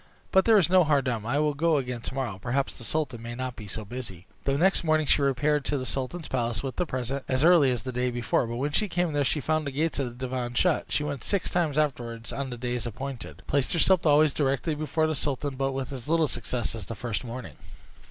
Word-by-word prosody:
But 190 0 +5
there 225 -2 +6
is 190 - +4
no 185 0 +5
harm 145 -3 +3
done: 115 -4 -2
I 130 +4 +1
will 150 0 +2
go 160 +2 +2
again 125 -3 -3
tomorrow; 125 -7 -3
perhaps 135 +4 -1
the 120 - -9
sultan 130 -3 -2
may 120 +1 -6
not 130 0 -4
be 105 - -9
so 105 +2 -5
busy." 100 -6 -7 0.2
The 135 0 +2
next 190 +4 +3
morning 155 -1 +2
she 145 - +3
repaired 145 +2 +2
to 145 - 0
the 130 - -3
sultan's 135 +6 -3
palace 120 -5 -1
with 135 -2 -4
the 180 - 0
present, 130 +1 -3
as 130 +2 +1
early 165 -5 +6
as 125 -3 -1
the 130 - -4
day 125 0 0
before; 120 0 0
but 115 - -4
when 140 +5 -1
she 210 +7 +1
came 175 -2 0
there 145 -1 +2
she 150 - +1
found 155 +1 0
the - - -2
gates 155 +2 0
of 135 - 0
the 120 +2 -6
divan 125 -1 -3
shut. 180 +2 +2
She 150 - +1
went 145 -4 -4
six 200 -3 0
times 160 -5 +1
afterward 120 -6 -1
on 140 -1 -3
the 120 - -6
days 120 -1 -2
appointed, 130 +2 -7
placed 140 -2 +1
herself 175 0 +4
always 150 0 +5
directly 140 +2 0
before 155 +1 0
the 155 - 0
sultan, 140 -1 -2
but 135 +1 0
with 135 0 -4
as 125 -1 -7
little 165 -1 +3
success 120 -2 -2
as 110 -4 -7
the 115 - -5
first 115 +1 -3
morning. 125 +1 -7
135 Hz, 250 wpm, -27 LUFS, 120-155 Hz, 0.2 s, there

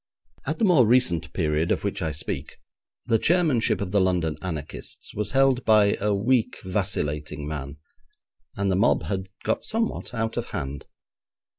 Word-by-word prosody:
At - - -1
the 230 - +2
more 155 - +5
recent 90 -10 +2
period 80 -1 0
of - - 0
which 100 -1 -2
I 80 - 0
speak, 70 -1 -5 0.5
the 115 - +2
chairmanship 155 - +2
of 95 -2 -3
the 100 -1 +3
London 90 -4 +1
anarchists 80 -5 -6
was 105 -1 -2
held 135 -1 +3
by 105 -2 +5
a 105 +1 +1
weak, 115 +4 +1
vacillating 75 -6 -2
man, 70 -2 -5 0.8
and 100 -1 0
the - - +2
mob 100 +6 +3
had 95 -1 -3 0.2
got - - 0
somewhat 225 - -2
out 115 0 -2
of - - -2
hand. 70 +1 -5
100 Hz, 160 wpm, -25 LUFS, 80-115 Hz, 0.8 s, more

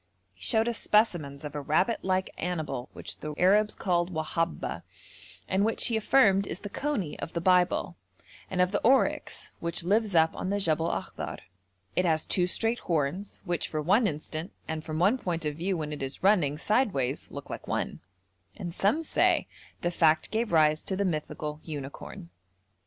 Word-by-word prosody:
He 90 - -27
showed 220 +1 +2
us 235 -1 -1
specimens 165 -10 +1
of 150 -1 -6
a 145 - -3
rabbit 180 - +2
like 185 0 0
animal 160 -7 -3
which - - -7
the 150 -1 -5
Arabs 205 +4 +4
call 175 -2 +1
'whabba,' 165 0 -2 0.7
and 190 +1 +2
which 225 +2 +1
he 235 - 0
affirmed 205 -4 +4
is 170 - -4
the 205 - -7
coney 235 - -2
of - - -6
the 170 - -1
Bible, 180 0 +2 0.5
and 180 -1 +1
of 180 0 +3
the 205 - 0
oryx, 265 +4 +2
which 170 0 -1
lives 205 +1 +1
up 160 0 +4
on 185 - -3
the 200 - +1
Jebel 165 -3 +1
Akhdar; - - -4 0.6
it 180 - +3
has 160 -3 +1
two 180 -1 +2
straight 225 +5 +1
horns 170 +4 -2
which 175 -4 -1
for 155 - -3
one 200 +9 +3
instant 155 +1 -4 0.2
and 160 -1 -3
from 155 -1 -4
one 200 +10 +3
point 170 -5 -3
of 150 - 0
view 180 +2 -1
when 150 -1 -3
it 150 - -6
is 135 +4 -5
running 175 -8 +3
sideways 160 - 0
look - - -8
like - - -7
one, - - -2 0.6
and 175 -5 -5
some 215 - +2
say - - +2 0.4
the 175 - 0
fact 160 -2 +3
gave 225 +1 0
rise 155 -2 +4
to 190 - 0
the 200 +1 0
mythical 150 -2 -3
unicorn. 140 - -7
175 Hz, 180 wpm, -28 LUFS, 155-200 Hz, 0.7 s, Arabs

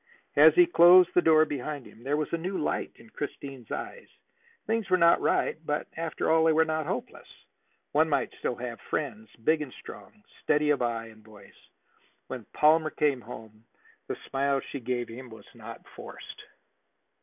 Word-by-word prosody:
As - - +7
he 355 -1 +7
closed 180 - +7
the 180 - +4
door 155 -2 +5
behind 145 -1 -5
him, 110 - -16
there 145 +3 0
was 155 +1 -3
a - - +2
new 185 +3 -3
light - - -2
in 115 - -18
Christine's 135 -4 -7
eyes. 485 - -6 0.6
Things 225 -3 -1
were 185 - +4
not 170 -1 +4
right, 160 - 0
but, 150 -1 -2
after 165 -1 -2
all, 160 0 +4
they 160 - +4
were 160 +1 +4
not 155 -1 -2
hopeless. - - -5 0.6
One 155 +2 +3
might 145 - 0
still 125 - -2
have 120 -1 -7
friends, 110 -8 -3
big 155 +4 +2
and 145 -4 -6
strong, 210 -1 -13 0.2
steady 150 0 +2
of 145 - 0
eye 115 -1 -2
and 110 -1 -18
voice. 105 -2 -18 0.6
When 125 -5 -7
Palmer 155 +1 +3
came 145 -5 0
home, 110 -1 -12 0.4
the - - -4
smile 140 0 0
she 140 - -5
gave 120 0 -3
him 125 +2 -10
was 110 -1 -13
not - - -11
forced. - - -10
145 Hz, 180 wpm, -27 LUFS, 120-160 Hz, 0.6 s, As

